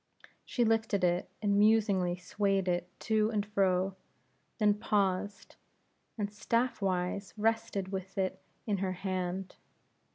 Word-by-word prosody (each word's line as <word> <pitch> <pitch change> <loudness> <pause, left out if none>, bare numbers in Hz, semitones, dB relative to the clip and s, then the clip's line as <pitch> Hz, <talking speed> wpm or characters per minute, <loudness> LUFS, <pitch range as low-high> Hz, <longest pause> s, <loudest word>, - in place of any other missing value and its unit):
She 240 - 0
lifted 220 -3 +1
it, 175 0 +1
and 200 -1 +3
musingly 205 -5 +3
swayed 195 +1 0
it 175 0 0
to 215 -1 +2
and 210 -2 0
fro; 190 -2 +1 0.6
then 210 -1 +4
paused, 200 -1 -1 0.6
and 205 -1 -2
staff 235 +3 0
wise 185 +1 -1
rested 225 -3 0
with 190 0 -5
it 190 -1 -1 0.2
in 205 -3 0
her 190 -1 -1
hand. 185 0 -3
200 Hz, 125 wpm, -31 LUFS, 185-210 Hz, 0.6 s, then